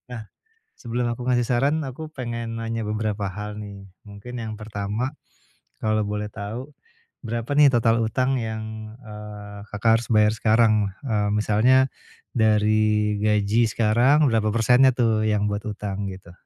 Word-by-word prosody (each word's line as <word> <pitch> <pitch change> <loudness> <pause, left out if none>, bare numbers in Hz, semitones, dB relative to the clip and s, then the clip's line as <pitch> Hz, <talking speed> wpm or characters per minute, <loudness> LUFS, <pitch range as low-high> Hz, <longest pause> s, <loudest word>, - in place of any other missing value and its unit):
Nah, 110 - -6 0.6
sebelum 120 0 -2
aku 125 +1 -5
ngasih 120 -1 +2
saran, 140 +6 +1
aku 135 +4 -7
pengen 115 -5 -5
nanya 115 -1 -3
beberapa 105 -2 -2
hal 105 +2 -6
nih. 100 -1 -9 0.2
Mungkin 115 +4 -8
yang 110 -1 -5
pertama 105 +4 -3 0.7
kalau 110 -1 +1
boleh 105 0 -3
tahu 110 +7 -6 0.6
berapa 115 +3 -4
nih 145 0 +6
total 115 0 +3
utang 130 +4 0
yang, 110 -1 -6
eee, 105 -3 -10 0.2
Kakak 115 +2 +3
harus 120 - -8
bayar 105 -2 +4
sekarang? 110 0 +3 0.3
Eee, 105 -5 0
misalnya 120 +5 +3 0.4
dari 105 -1 +2
gaji 105 +2 +2
sekarang 120 +8 +3
berapa 110 -1 +1
persennya 125 +3 +5
tuh 110 -3 +2
yang 105 -1 +1
buat 105 0 -3
utang 100 -1 -4
gitu? 95 -2 -11
110 Hz, 140 wpm, -24 LUFS, 105-120 Hz, 0.7 s, nih